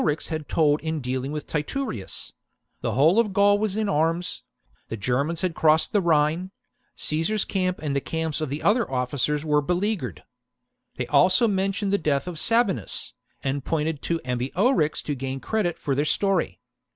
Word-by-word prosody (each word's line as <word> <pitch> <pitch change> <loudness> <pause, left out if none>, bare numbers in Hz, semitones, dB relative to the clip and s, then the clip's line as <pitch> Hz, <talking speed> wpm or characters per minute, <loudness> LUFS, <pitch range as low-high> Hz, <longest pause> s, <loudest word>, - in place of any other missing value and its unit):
tale - - 0
that 150 - +4
Ambiorix - - -7
had 155 -2 -4
told 150 -2 +2
in 160 0 -2
dealing 130 +1 -3
with 150 -1 -4
Titurius: 150 - -4 0.5
the - - -1
whole 155 - +4
of 215 -4 +1
Gaul 205 +1 +4
was 210 -1 -1
in 215 -1 0
arms; 165 0 0 0.5
the 115 - -5
Germans 140 +10 0
had 185 -3 0
crossed 155 +3 +3
the 205 - +3
Rhine; 165 +2 +2 0.5
Caesar's 165 +7 0
camp 185 -2 -1
and 145 -2 -1
the 140 - +1
camps 160 -1 -3
of 155 - -2
the 145 +3 -4
other 225 +2 +2
officers 135 +4 -1
were 150 -1 +3
be 175 +5 0
leaguered. 175 - -2 0.7
They - - -3
also 210 +6 +4
mentioned 195 0 0
the 200 - +3
death 145 -1 0
of 170 -3 -3
Sabinus, 205 - +1 0.3
and 135 0 -2
pointed 155 -1 -1
to 165 -1 -1
Ambiorix 150 - +1
to 150 - -2
gain 135 0 -4
credit 195 0 -1
for 140 - -2
their 140 +2 +1
story. 175 - 0
160 Hz, 180 wpm, -25 LUFS, 145-195 Hz, 0.7 s, that